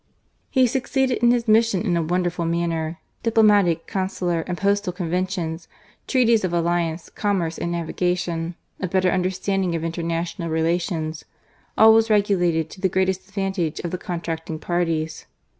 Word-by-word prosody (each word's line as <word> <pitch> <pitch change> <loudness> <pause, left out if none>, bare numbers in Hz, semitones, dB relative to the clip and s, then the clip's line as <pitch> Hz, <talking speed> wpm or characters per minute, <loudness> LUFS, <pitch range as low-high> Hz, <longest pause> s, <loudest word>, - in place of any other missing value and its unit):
He 260 -2 +4
succeeded 260 +1 0
in 240 - +5
his 240 -1 +2
mission 220 -3 +3
in 180 -5 +1
a 170 - +2
wonderful 175 +1 -1
manner. 165 -1 -1 0.2
Diplomatic, 205 -7 +3
consular, 185 -3 -1
and 180 -1 -3
postal 200 -1 +1
con 175 -2 -4
ventions; 180 -2 -2 0.4
treaties 235 -5 +3
of 185 - 0
alliance, 170 -1 0
commerce, 185 -6 -1
and 170 - -2
navigation; 170 0 -2 0.2
a 185 - -2
better 185 0 +2
understanding 185 0 0
of 165 - -3
international 165 0 -3
relations 160 0 -1 0.3
— - - -36
all 220 0 +8
was 225 0 +4
regulated 180 -6 +2
to 185 - -11
the 190 - +2
greatest 190 0 0
ad 200 - -23
vantage 190 -5 -1
of 170 - -4
the 180 - -3
contracting 165 -3 -4
parties. 160 -2 -2
180 Hz, 155 wpm, -23 LUFS, 165-200 Hz, 0.4 s, all